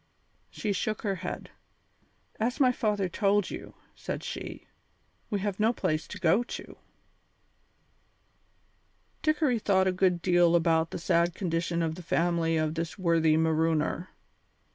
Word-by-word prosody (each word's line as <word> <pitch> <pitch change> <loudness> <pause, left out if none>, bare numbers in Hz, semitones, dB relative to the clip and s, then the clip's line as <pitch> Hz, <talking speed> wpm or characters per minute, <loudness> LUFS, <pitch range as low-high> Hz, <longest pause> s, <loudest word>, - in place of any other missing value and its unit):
She 210 -2 -2
shook 215 +2 -2
her 200 -3 -1
head. 180 +1 -6 0.9
"As 235 +3 -1
my 255 -3 +5
father 210 -5 0
told 200 +2 +1
you," - - -8 0.2
said - - -5
she, - - -6 0.6
"we 205 - -1
have 200 -1 -2
no 220 +2 +4
place 155 -7 -1
to 205 - -7
go 185 +5 +3
to." 245 - -8 2.4
Dickory 305 -6 +2
thought 190 -3 +2
a 190 - +3
good 185 -1 +2
deal 175 -1 +4
about 165 -1 +2
the - - -5
sad 170 0 +1
condition 170 -2 -1
of 160 -1 -1
the 180 - -8
family 170 -1 +1
of 155 -1 0
this 165 0 -4
worthy 165 -4 +3
marooner. 160 +2 +1
175 Hz, 140 wpm, -28 LUFS, 165-205 Hz, 2.4 s, my